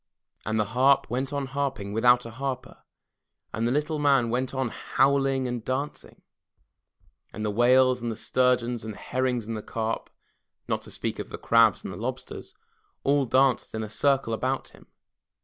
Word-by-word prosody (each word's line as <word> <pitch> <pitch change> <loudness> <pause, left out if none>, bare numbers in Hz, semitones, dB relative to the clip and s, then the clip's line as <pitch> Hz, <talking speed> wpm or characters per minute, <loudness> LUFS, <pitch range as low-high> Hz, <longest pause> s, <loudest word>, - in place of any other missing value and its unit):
And 110 0 0
the - - +4
harp 130 -2 +3
went 130 +3 -1
on 140 -1 -2
harping 135 -7 -3
without 120 +2 +4
a 115 - -7
harper, 130 +2 -5 0.8
and 115 +2 0
the - - 0
little 150 +2 0
man 135 -5 +3
went 125 +1 -1
on 130 -2 -1
howling 135 +1 +1
and 120 -2 -4
dancing, 135 +4 -4 1.1
and 110 - -5
the 105 - 0
whales 125 +3 +4
and 120 -1 -2
the - - -4
stur 125 +3 +2
geons 120 -1 -5
and 110 -1 -6
herrings 125 -2 -1
and 110 -1 -5
carp, 115 0 -3 0.6
not - - -1
to - - -12
speak - - -4
of - - -6
the - - -6
crabs 115 -3 +4
and - - -6
the - - -8
lobsters, 125 +5 -6 0.5
all 140 0 +3
danced 130 -1 +2
in 110 - -2
a 110 - -6
circle 135 0 +1
about 130 +4 -2
him. - - -19
125 Hz, 175 wpm, -26 LUFS, 115-135 Hz, 1.1 s, the